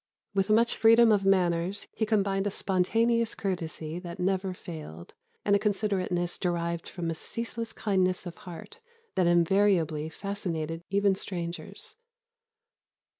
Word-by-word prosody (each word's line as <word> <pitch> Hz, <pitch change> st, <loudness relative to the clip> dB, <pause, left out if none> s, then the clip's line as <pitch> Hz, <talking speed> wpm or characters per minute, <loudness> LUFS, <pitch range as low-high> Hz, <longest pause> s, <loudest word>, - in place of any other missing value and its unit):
With 195 Hz, +1 st, +1 dB
much 230 Hz, +2 st, +4 dB
freedom 230 Hz, +1 st, +6 dB
of 200 Hz, -2 st, +3 dB
manners, 180 Hz, 0 st, +2 dB
he 220 Hz, -, -1 dB
combined 200 Hz, -2 st, +1 dB
a -, -, +2 dB
spontaneous 225 Hz, +5 st, +1 dB
courtesy 170 Hz, -4 st, -3 dB
that 175 Hz, -1 st, -8 dB
never 190 Hz, +1 st, 0 dB
failed, 155 Hz, -, -9 dB, 0.3 s
and 200 Hz, -, +4 dB
a -, -, +3 dB
considerateness 195 Hz, -4 st, -1 dB
derived 170 Hz, -2 st, -1 dB
from 170 Hz, -2 st, -3 dB
a -, -, -1 dB
ceaseless 230 Hz, +6 st, -4 dB
kindness 185 Hz, -3 st, 0 dB
of 175 Hz, -, -5 dB
heart 180 Hz, -, -10 dB, 0.3 s
that 185 Hz, -3 st, +2 dB
invariably 170 Hz, -3 st, +3 dB
fascinated 165 Hz, -4 st, -4 dB
even 200 Hz, 0 st, +3 dB
strangers." 175 Hz, -3 st, -5 dB
190 Hz, 125 wpm, -28 LUFS, 170-205 Hz, 0.3 s, freedom